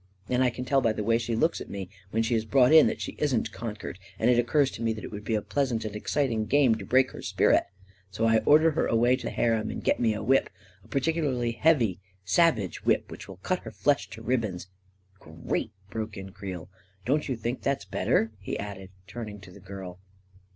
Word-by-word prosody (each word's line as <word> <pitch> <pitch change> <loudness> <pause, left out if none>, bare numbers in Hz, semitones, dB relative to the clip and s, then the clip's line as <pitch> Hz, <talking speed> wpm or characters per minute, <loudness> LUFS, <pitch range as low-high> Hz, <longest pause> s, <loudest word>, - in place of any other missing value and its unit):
And 125 +1 +2
I 125 - +4
can 125 +1 -6
tell 135 +1 +3
by 115 -3 +2
the 105 - -3
way 115 +2 +2
she 120 -1 -2
looks 160 +9 +1
at - - -8
me, 100 -2 -5 0.2
when 110 +2 0
she 115 +2 0
is 110 -1 +1
brought 125 +4 +4
in, 160 - +8
that - - -2
she - - -4
isn't 125 -7 0
con 110 -1 -5
quered, 100 - -7 0.2
and 120 +3 +3
it 120 - +4
occurs 135 +3 +2
to - - -8
me 115 -1 +1
that 110 - -8
it - - -7
would 105 0 -7
be 110 - -1
a 105 - -1
pleas 140 -2 0
ant 115 -1 -2
and 105 -1 -5
exciting 115 -1 -1
game 140 -4 +4
to 110 - -5
break 130 0 +3
her - - -9
spirit, - - +3 0.4
so 110 +4 -1
I 115 0 +4
or 145 +7 +6
der 160 +1 +3
her - - 0
away 120 +2 +3
to 130 - -6
the - - -1
harem, 115 -2 0
and - - -5
get - - +2
me 115 -3 +2
a 105 - -5
whip 135 +1 +3 0.2
— 95 +1 -28
a - - -19
particularly 135 -4 0
heavy 120 -3 +3
and 90 - -13 0.3
savage 110 - +2
whip, - - +1
which - - -9
will - - -10
cut - - 0
her - - -9
flesh - - 0
to - - -10
ribbons., 110 -7 -2 0.2
." 95 +1 -38
" - - -31
Great! 80 +6 -4
" 95 - -30
broke 110 -1 -4
in 95 0 -8
Creel. 95 -3 -7 0.2
" 95 +1 -34
Don't 150 +3 0
you 130 - 0
think 120 +3 -4
that's 140 0 -1
better? 110 - +1
" - - -29
he 95 - -4
added, 100 -2 -7 0.2
turning 105 0 -7
to 95 - -13
the 100 - -13
girl. 95 -1 -9
115 Hz, 255 wpm, -27 LUFS, 100-130 Hz, 0.4 s, in